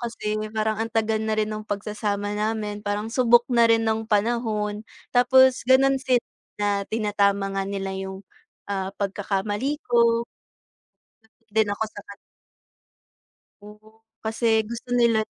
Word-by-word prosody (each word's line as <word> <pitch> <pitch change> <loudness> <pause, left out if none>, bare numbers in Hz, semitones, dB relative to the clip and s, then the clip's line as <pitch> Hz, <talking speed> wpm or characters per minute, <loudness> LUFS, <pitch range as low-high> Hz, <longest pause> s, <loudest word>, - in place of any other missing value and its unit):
kasi, 225 -3 -3 0.2
parang 220 0 -1
ang 225 - -1
tagal 220 -1 +1
na 220 0 -1
rin 215 0 0
ng 215 0 -7
pagsasama 205 0 -3
namin, 210 0 -2
parang 210 +2 -3
subok 240 -2 +5
na 235 -1 +5
rin 225 0 +3
ng 220 0 -1
panahon. 210 -1 0 0.3
Tapos 260 +1 +5
gano'n 270 +1 +4
sila 250 -2 +1 0.3
na 205 0 0 0.2
tinatama 200 -2 +1
nga 195 0 -1
nila 195 -1 -3
yung, 190 0 -6 0.4
ah, 195 -2 -3
pagkakamali 205 +6 -2
ko. 235 -1 +3 1.2
Din 210 -1 +1
ako 210 - -2
saka 200 -1 -11 1.5
Oo, 215 +1 -16 0.2
kasi 225 0 +1
gusto 235 +2 -8
nila 235 -3 +3
215 Hz, 130 wpm, -24 LUFS, 205-230 Hz, 1.5 s, subok